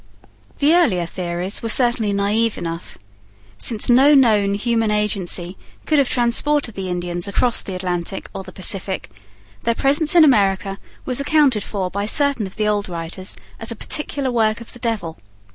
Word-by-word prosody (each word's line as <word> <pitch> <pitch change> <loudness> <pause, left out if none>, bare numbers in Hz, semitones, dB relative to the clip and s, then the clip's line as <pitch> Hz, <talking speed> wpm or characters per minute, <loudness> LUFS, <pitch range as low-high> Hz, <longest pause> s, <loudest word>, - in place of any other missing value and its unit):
The 295 +3 +3
earlier 235 - +2
theories 175 +2 -3
were 230 - -3
certainly 240 -3 +3
naive 205 +3 0
enough. 165 0 -6 0.6
Since 215 - +2
no 270 +4 +5
known 210 -7 +3
human 225 +1 0
agency 195 -4 -1 0.3
could 305 -2 +2
have 275 - +2
transported 245 +2 +1
the 190 -2 -5
Indians 175 0 -3
across 235 +4 +1
the 190 - -6
Atlantic 180 0 -3
or - - -5
the 185 - -11
Pacific, 190 - -1 0.5
their 230 0 0
presence 295 +6 +2
in 335 - +8
America 195 -7 +2 0.3
was 255 0 -1
accounted 280 -7 +2
for 190 -3 -4
by 200 +1 -3
certain 280 -4 0
of 190 - -13
the 215 0 -1
old 205 -2 -1
writers 175 +2 -4 0.2
as 225 - -1
a 230 - -1
particular 280 +2 -2
work 220 -2 +1
of 235 - -12
the 245 - -13
devil. 220 -9 -3
210 Hz, 165 wpm, -19 LUFS, 190-245 Hz, 0.6 s, in